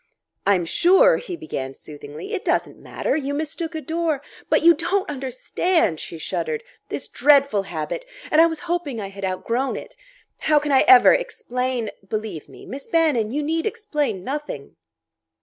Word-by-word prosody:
"I'm 190 Hz, -4 st, +3 dB
sure," 385 Hz, -, +5 dB
he 375 Hz, -8 st, -6 dB
began 135 Hz, -, -5 dB
soothingly; 150 Hz, +1 st, -9 dB
"it -, -, -2 dB
doesn't -, -, 0 dB
matter. -, -, -2 dB
You 285 Hz, -2 st, -2 dB
mistook 315 Hz, +2 st, -3 dB
a 315 Hz, -, -3 dB
door 320 Hz, -3 st, -1 dB
" -, -, -21 dB
"But -, -, +3 dB
you 340 Hz, +1 st, +8 dB
don't 390 Hz, +3 st, -1 dB
understand!" 265 Hz, -, 0 dB
She 165 Hz, -, -7 dB
shuddered.... 465 Hz, -, -3 dB, 0.3 s
"This -, -, -4 dB
dreadful 280 Hz, -7 st, +4 dB
habit! 160 Hz, -, -4 dB, 0.3 s
And 310 Hz, -, +6 dB
I 335 Hz, -, +7 dB
was 325 Hz, -1 st, -4 dB
hoping 340 Hz, -8 st, -2 dB
I 200 Hz, -2 st, -5 dB
had 195 Hz, 0 st, -10 dB
outgrown 230 Hz, +8 st, -1 dB
it! -, -, -8 dB, 0.4 s
How 305 Hz, -1 st, +3 dB
can 295 Hz, 0 st, +1 dB
I 265 Hz, -, +6 dB
ever 385 Hz, 0 st, +9 dB
explain 250 Hz, -, -2 dB
?" 195 Hz, -, -28 dB
"Believe 215 Hz, -8 st, -4 dB
me, -, -, -13 dB
Miss 270 Hz, +2 st, -7 dB
Bannon, 300 Hz, -10 st, +2 dB
you 290 Hz, +5 st, -2 dB
need 325 Hz, +5 st, 0 dB
explain 300 Hz, -, -2 dB
nothing." 275 Hz, -, -5 dB
285 Hz, 170 wpm, -23 LUFS, 210-335 Hz, 0.4 s, ever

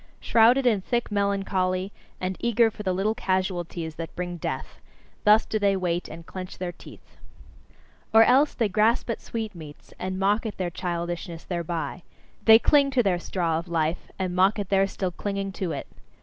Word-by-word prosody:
Shrouded 240 Hz, +4 st, +4 dB
in 220 Hz, -5 st, +3 dB
thick 240 Hz, +3 st, -2 dB
melancholy, 195 Hz, -2 st, 0 dB, 0.3 s
and 185 Hz, +1 st, -2 dB
eager 235 Hz, -1 st, +3 dB
for 210 Hz, -, -9 dB
the 190 Hz, -3 st, -1 dB
little 195 Hz, +4 st, 0 dB
casualties 180 Hz, -6 st, -2 dB
that 165 Hz, 0 st, -6 dB
bring 175 Hz, -1 st, -4 dB
death: -, -, -5 dB, 0.5 s
thus 210 Hz, +1 st, +6 dB
do 215 Hz, -, -2 dB
they 200 Hz, -1 st, +3 dB
wait, 175 Hz, -1 st, -1 dB
and 165 Hz, +1 st, -10 dB
clench 185 Hz, 0 st, -8 dB
their 180 Hz, -1 st, -3 dB
teeth. 175 Hz, -, -16 dB, 0.9 s
Or 225 Hz, 0 st, +8 dB
else, 265 Hz, +6 st, +4 dB
they 230 Hz, -, +1 dB
grasp 220 Hz, +4 st, +2 dB
at -, -, -5 dB
sweetmeats, 185 Hz, -10 st, -7 dB
and 185 Hz, 0 st, -3 dB
mock 205 Hz, +4 st, +1 dB
at 215 Hz, -, -6 dB
their 180 Hz, -2 st, -2 dB
childishness 170 Hz, -1 st, -4 dB
thereby: 170 Hz, 0 st, -4 dB, 0.4 s
they 220 Hz, 0 st, +10 dB
cling 280 Hz, +4 st, +4 dB
to 260 Hz, -3 st, +2 dB
their 185 Hz, -4 st, +1 dB
straw 170 Hz, -3 st, -1 dB
of 170 Hz, -, -9 dB
life, 165 Hz, 0 st, -1 dB
and 185 Hz, -2 st, -2 dB
mock 190 Hz, +4 st, +4 dB
at 200 Hz, -2 st, -4 dB
their 195 Hz, 0 st, +3 dB
still 190 Hz, -2 st, -3 dB
clinging 195 Hz, +2 st, -3 dB
to 185 Hz, -2 st, -3 dB
it. 140 Hz, -, -4 dB
190 Hz, 175 wpm, -25 LUFS, 175-215 Hz, 0.9 s, they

